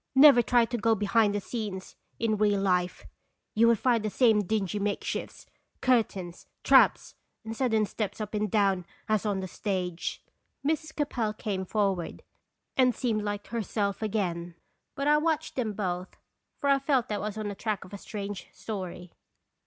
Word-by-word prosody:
"Never 270 Hz, -2 st, +9 dB
try 240 Hz, -1 st, +3 dB
to 240 Hz, +1 st, -3 dB
go 225 Hz, +1 st, +3 dB
behind 210 Hz, 0 st, +2 dB
the -, -, +1 dB
scenes 200 Hz, -3 st, -5 dB, 0.2 s
in 225 Hz, -2 st, +1 dB
real 205 Hz, -1 st, +2 dB
life. 180 Hz, -2 st, 0 dB, 0.5 s
You 230 Hz, +2 st, +5 dB
would 235 Hz, -1 st, +5 dB
find 235 Hz, -1 st, +2 dB
the 215 Hz, -, 0 dB
same 220 Hz, -1 st, +4 dB
dingy 205 Hz, 0 st, -1 dB
makeshifts, 205 Hz, 0 st, -3 dB, 0.3 s
cur 255 Hz, -3 st, +5 dB
tains, 180 Hz, -5 st, -9 dB, 0.2 s
traps, -, -, +5 dB, 0.3 s
and 225 Hz, 0 st, -5 dB
sudden 225 Hz, -4 st, +2 dB
steps 205 Hz, 0 st, -4 dB
up 215 Hz, -1 st, -5 dB
and 210 Hz, 0 st, 0 dB
down, 195 Hz, -3 st, +2 dB, 0.2 s
as 215 Hz, -1 st, +1 dB
on 195 Hz, -2 st, 0 dB
the 190 Hz, -, -4 dB
stage." 180 Hz, -3 st, -3 dB, 0.4 s
Mrs. 310 Hz, +1 st, -1 dB
Capel 245 Hz, -8 st, -1 dB
came 195 Hz, -3 st, -3 dB
forward, 195 Hz, -4 st, -1 dB, 0.5 s
and 255 Hz, -2 st, +4 dB
seemed 225 Hz, -4 st, 0 dB
like 205 Hz, 0 st, -3 dB
herself 210 Hz, -2 st, -2 dB
again. 175 Hz, -6 st, -2 dB, 0.4 s
But 275 Hz, +1 st, -2 dB
I 300 Hz, 0 st, +6 dB
watched 315 Hz, 0 st, -1 dB
them 230 Hz, -5 st, -1 dB
both, 185 Hz, -2 st, -3 dB, 0.4 s
for 285 Hz, -, -2 dB
I 275 Hz, -1 st, +5 dB
felt 270 Hz, -3 st, +1 dB
that 210 Hz, -1 st, -1 dB
1 210 Hz, -, -2 dB
was 215 Hz, 0 st, -5 dB
on 215 Hz, -1 st, -3 dB
the -, -, -4 dB
track 210 Hz, 0 st, -3 dB
of 185 Hz, -, -15 dB
a 200 Hz, -, -6 dB
strange 205 Hz, -2 st, -6 dB
story. 185 Hz, -4 st, -6 dB
210 Hz, 175 wpm, -28 LUFS, 195-230 Hz, 0.5 s, Never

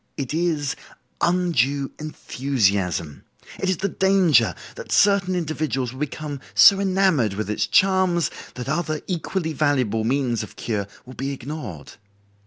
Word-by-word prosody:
It 140 Hz, -1 st, -3 dB
is 160 Hz, -4 st, 0 dB, 0.5 s
undue 145 Hz, -6 st, +1 dB
enthusiasm. 100 Hz, -, -1 dB, 0.4 s
It 190 Hz, -, -1 dB
is 185 Hz, -, +1 dB
the 195 Hz, -, -1 dB
danger 185 Hz, -, +3 dB, 0.2 s
that -, -, -9 dB
certain 195 Hz, -2 st, +3 dB
individuals 155 Hz, -7 st, -2 dB
will 130 Hz, -, -10 dB
become 150 Hz, 0 st, -4 dB, 0.2 s
so 195 Hz, -1 st, +8 dB
enamored 185 Hz, -, +2 dB
with 105 Hz, +1 st, -3 dB
its 105 Hz, -, 0 dB
charms 185 Hz, -4 st, +3 dB, 0.2 s
that 125 Hz, 0 st, -6 dB
other 155 Hz, +1 st, -1 dB
equally 175 Hz, -2 st, -2 dB
valuable 130 Hz, -7 st, +1 dB
means 125 Hz, -1 st, 0 dB
of 105 Hz, -, -9 dB
cure 105 Hz, -4 st, -3 dB, 0.2 s
will 130 Hz, -, -11 dB
be 135 Hz, +2 st, -4 dB
ignored. 125 Hz, -, -7 dB
145 Hz, 135 wpm, -23 LUFS, 125-175 Hz, 0.5 s, so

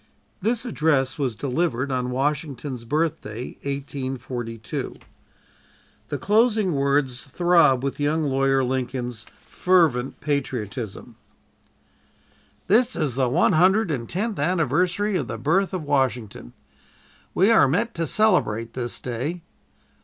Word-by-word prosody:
This 230 Hz, +4 st, 0 dB
address 150 Hz, -, +1 dB
was 130 Hz, -5 st, -1 dB
delivered 135 Hz, +1 st, -1 dB
on 125 Hz, -1 st, -1 dB
Washington's 135 Hz, -2 st, -2 dB
Birthday, 125 Hz, -5 st, -2 dB
1842. 130 Hz, -5 st, -5 dB, 1.1 s
The -, -, -3 dB
closing 215 Hz, -2 st, +2 dB
words 140 Hz, -3 st, +1 dB
throb 155 Hz, -2 st, +3 dB
with 140 Hz, +1 st, -3 dB
young 150 Hz, +2 st, +1 dB
Lawyer 135 Hz, -1 st, +2 dB
Lincoln's 125 Hz, -2 st, -3 dB, 0.2 s
fervent 160 Hz, -9 st, +2 dB
patriotism: 125 Hz, -7 st, -4 dB, 1.5 s
"This 240 Hz, +5 st, +3 dB
is 150 Hz, -6 st, -1 dB
the 130 Hz, 0 st, +1 dB
one 160 Hz, +8 st, +3 dB
hundred 190 Hz, +4 st, +4 dB
and 120 Hz, -5 st, -3 dB
tenth 210 Hz, +2 st, -2 dB
anniversary 180 Hz, +5 st, +1 dB
of 140 Hz, -8 st, -3 dB
the 115 Hz, -, -4 dB
birth 165 Hz, -, +1 dB
of 185 Hz, -4 st, -3 dB
Washington; 125 Hz, -, -1 dB, 0.8 s
we 195 Hz, +5 st, +4 dB
are 225 Hz, -, +6 dB
met 220 Hz, -, 0 dB
to 165 Hz, -2 st, -2 dB
celebrate 115 Hz, -, +2 dB
this 120 Hz, -2 st, -3 dB
day. 135 Hz, +8 st, -4 dB
140 Hz, 115 wpm, -24 LUFS, 125-175 Hz, 1.5 s, are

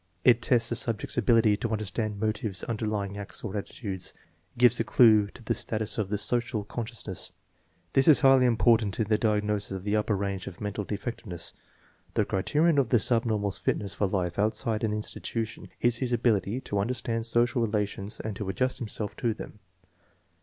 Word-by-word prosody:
It 120 Hz, -2 st, +6 dB
tests 115 Hz, 0 st, +2 dB
the 120 Hz, -, -1 dB
subject's 115 Hz, -2 st, -1 dB
ability 115 Hz, -1 st, +4 dB
to 115 Hz, -, -3 dB
understand 110 Hz, 0 st, -2 dB
motives 110 Hz, -3 st, -2 dB
underlying 105 Hz, -3 st, -3 dB
acts 100 Hz, -, -8 dB
or 105 Hz, -2 st, -4 dB
attitudes. 100 Hz, -2 st, -5 dB, 0.4 s
It -, -, -23 dB
gives 125 Hz, 0 st, +5 dB
a -, -, +2 dB
clue 110 Hz, -2 st, +5 dB
to 115 Hz, -, -14 dB
the -, -, 0 dB
status 110 Hz, 0 st, 0 dB
of 100 Hz, -3 st, -1 dB
the 105 Hz, -, 0 dB
social 120 Hz, 0 st, 0 dB
consciousness. 110 Hz, -3 st, -6 dB, 0.6 s
This 135 Hz, -, +4 dB
is 155 Hz, -, +7 dB
highly 135 Hz, -2 st, +6 dB
important 115 Hz, -3 st, +3 dB
in 110 Hz, -, +2 dB
the 105 Hz, -1 st, +3 dB
diagnosis 105 Hz, -1 st, 0 dB
of 95 Hz, -1 st, -5 dB
the 105 Hz, +1 st, 0 dB
upper 105 Hz, -1 st, +1 dB
range 100 Hz, -1 st, -3 dB
of 90 Hz, -, -8 dB
mental 105 Hz, 0 st, -3 dB
defectiveness. 100 Hz, -5 st, -5 dB, 0.6 s
The -, -, +2 dB
criterion 150 Hz, -, +2 dB
of 130 Hz, -4 st, +1 dB
the 120 Hz, -, +4 dB
subnormal's 110 Hz, -3 st, 0 dB
fitness 100 Hz, -2 st, -1 dB
for 100 Hz, -, 0 dB
life 90 Hz, -2 st, -2 dB
outside 110 Hz, +1 st, 0 dB
an 110 Hz, -, +1 dB
institution 110 Hz, +1 st, -4 dB
is 120 Hz, -1 st, +3 dB
his 125 Hz, 0 st, -2 dB
ability 115 Hz, -1 st, +1 dB
to 100 Hz, -5 st, -2 dB
under 115 Hz, +6 st, 0 dB
stand 115 Hz, -1 st, -2 dB
social 120 Hz, +2 st, +2 dB
relations 105 Hz, -1 st, -2 dB
and 110 Hz, -2 st, -4 dB
to 105 Hz, -3 st, -4 dB
adjust 130 Hz, +7 st, -1 dB
himself 105 Hz, -2 st, -2 dB
to 115 Hz, -3 st, 0 dB
them. 105 Hz, -, -9 dB
110 Hz, 180 wpm, -28 LUFS, 100-120 Hz, 0.6 s, is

